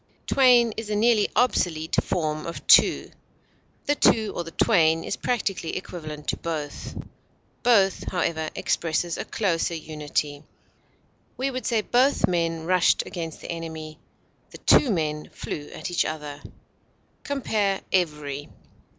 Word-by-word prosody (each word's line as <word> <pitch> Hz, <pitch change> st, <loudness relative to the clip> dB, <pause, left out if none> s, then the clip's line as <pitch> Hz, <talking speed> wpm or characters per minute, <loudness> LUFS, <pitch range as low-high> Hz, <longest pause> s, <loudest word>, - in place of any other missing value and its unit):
Twain 245 Hz, -4 st, +5 dB
is 220 Hz, -1 st, -5 dB
a 210 Hz, -, 0 dB
nearly 220 Hz, 0 st, +3 dB
obsolete 165 Hz, -10 st, +1 dB
form 155 Hz, -3 st, -2 dB
of 170 Hz, -, -7 dB
two. -, -, +5 dB, 0.7 s
The 290 Hz, -, +2 dB
two, 220 Hz, -6 st, +3 dB
or 175 Hz, -, -2 dB
the 165 Hz, -, -8 dB
twain, 165 Hz, -4 st, +3 dB
is -, -, -3 dB
practically 200 Hz, -8 st, -2 dB
equivalent 155 Hz, -5 st, -8 dB
to -, -, 0 dB
both; 155 Hz, -3 st, -5 dB, 0.6 s
both, 200 Hz, -6 st, +3 dB
however, 160 Hz, -3 st, -1 dB
expresses 165 Hz, +1 st, -1 dB
a -, -, -5 dB
closer 170 Hz, -5 st, -1 dB
unity. 150 Hz, -2 st, -3 dB, 1.0 s
We 270 Hz, +2 st, -1 dB
would 255 Hz, 0 st, -4 dB
say 230 Hz, -3 st, +2 dB
both 255 Hz, +6 st, +3 dB
men 165 Hz, -2 st, -1 dB
rushed 180 Hz, 0 st, +3 dB
against 165 Hz, -3 st, -6 dB
the -, -, -6 dB
enemy; 160 Hz, -2 st, -7 dB, 0.5 s
the -, -, -11 dB
two 280 Hz, -, +4 dB
men 155 Hz, -6 st, -1 dB
flew 145 Hz, -1 st, -6 dB
at -, -, -6 dB
each 175 Hz, -, +2 dB
other. 150 Hz, -2 st, -6 dB, 0.8 s
Compare 215 Hz, -8 st, -1 dB
EVERY. 150 Hz, -5 st, -1 dB
170 Hz, 135 wpm, -25 LUFS, 155-215 Hz, 1.0 s, Twain